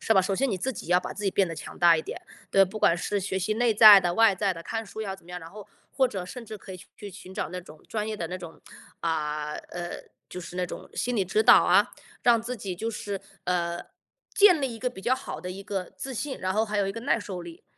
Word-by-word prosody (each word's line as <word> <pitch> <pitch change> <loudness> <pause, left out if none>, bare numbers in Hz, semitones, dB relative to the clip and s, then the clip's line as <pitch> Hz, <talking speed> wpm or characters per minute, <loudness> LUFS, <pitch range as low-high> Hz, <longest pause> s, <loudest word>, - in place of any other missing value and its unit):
是 225 - +2
吧？ 190 - +6
首 195 +1 -1
先 270 0 +1
你 190 - -2
自 260 +9 -1
己 185 - -8
要 180 +1 +4
把 - - -6
自 205 - -6
己 195 - +2
变 190 -2 +2
得 165 - -5
强 - - -9
大 170 -1 +6
一 160 - -2
点， - - -7 0.3
对。 195 - +6
不 195 +3 -7
管 170 - +4
是 190 +4 -2
学 190 0 -2
习 190 +4 -1
内 235 0 +2
在 210 -2 +10
的、 175 -2 0
外 225 0 +5
在 195 +1 0
的， 165 -2 -9
看 225 +4 -4
书 215 - -8
要 195 -3 -4
怎 190 - -21
么 175 - -14
样。 180 - -5
然 165 - -10
后 210 +1 -11 0.3
或 265 -1 +3
者 190 -7 -5
甚 240 +6 -8
至 215 -1 -8
可 190 -1 -10
以 180 - -10
去 205 - -9
寻 190 -1 -11
找 175 - -3
那 180 - -5
种 155 -3 -15
专 215 -1 -2
业 220 - -3
的 175 -5 -4
那 180 +3 -5
种 170 -3 -10 0.4
啊， 150 -2 -2
呃， 175 0 -6 0.3
就 - - -7
是 175 - -9
那 180 0 0
种 - - -9
心 245 - -1
理 195 - +2
指 210 +4 +1
导 - - +8
啊， - - +4 0.3
让 235 -2 +4
自 245 +2 -4
己 195 -5 -5
就 225 +5 -3
是， 205 -2 -4 0.3
呃， 175 -1 -1 0.5
建 400 -7 +6
立 260 -4 -2
一 - - -9
个 250 +2 -1
比 190 - -11
较 240 +7 +2
好 260 - -7
的 180 - -6
一 195 +2 -7
个 195 -2 -3
自 270 - -6
信， 265 +3 -4
然 185 0 -1
后 215 +3 +1
还 210 0 -3
有 200 -1 +2
一 195 - -2
个 230 - -6
耐 240 0 +1
受 195 -3 -6
力。 170 -1 -11
195 Hz, 305 characters per minute, -27 LUFS, 180-220 Hz, 0.5 s, 在